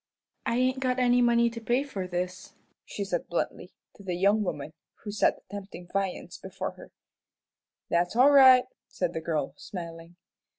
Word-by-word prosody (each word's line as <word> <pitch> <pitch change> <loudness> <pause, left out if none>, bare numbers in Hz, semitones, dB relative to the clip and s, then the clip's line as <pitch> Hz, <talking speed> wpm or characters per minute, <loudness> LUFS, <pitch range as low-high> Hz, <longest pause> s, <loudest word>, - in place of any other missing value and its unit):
"I 235 - +1
ain't 255 +1 +1
got 255 -1 0
any 245 -1 +4
money 235 -1 +4
to 230 0 -7
pay 240 +4 +1
for 195 -10 -5
this," 180 +1 -4 0.3
she 200 - -5
said, 175 -3 -2
bluntly, 175 +1 -3 0.2
to - - -16
the 180 -2 -3
young 200 +4 +3
woman 155 -5 -4 0.3
who 210 - -5
set 205 - +2
the - - -22
tempting 190 -3 -8
viands 195 -2 -3
before - - -5
her. - - -14 1.0
"That's 175 +4 0
all 260 +4 +6
right," 260 -3 +8 0.2
said 180 -2 -2
the 160 - -3
girl, 160 -2 -2
smiling. 170 -2 -8
195 Hz, 170 wpm, -28 LUFS, 175-245 Hz, 1.0 s, right